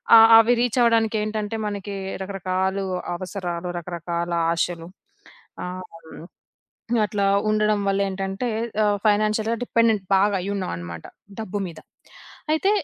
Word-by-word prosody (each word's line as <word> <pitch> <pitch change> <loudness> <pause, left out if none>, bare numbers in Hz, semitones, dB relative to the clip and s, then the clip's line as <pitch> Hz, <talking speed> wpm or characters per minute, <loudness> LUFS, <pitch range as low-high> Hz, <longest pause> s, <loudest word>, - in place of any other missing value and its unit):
అ - - +11 0.2
అవి 235 +2 +4
రీచ్ 245 0 +1
అవ్వడానికి 225 -2 +3
ఏంటంటే 215 0 -3
మనకి 200 -1 -5 0.3
రకరకాలు 190 0 -2 0.3
అవసరాలు, 180 -2 -4
రకరకాల 170 0 -4 0.2
ఆశలు 170 0 -2 0.7
ఆహ్, 180 +1 -5 0.3
హ్మ్. 160 +1 -11 0.8
అట్లా 205 -1 -1 0.3
ఉండడం 215 -1 +2
వళ్లేంటంటే, 195 +2 -1 0.4
ఆహ్, 205 -1 +2
ఫైనాన్షియల్‌గా 215 +2 +2
డిపెండెంట్ 230 -4 +2
బాగా 200 +1 +3
అయ్యున్నామనమాట. 85 - -4 0.4
డబ్బు 205 -2 -4
మీద. 165 -2 -9 0.7
అయితే 350 +6 +2
200 Hz, 105 wpm, -23 LUFS, 180-215 Hz, 0.8 s, అ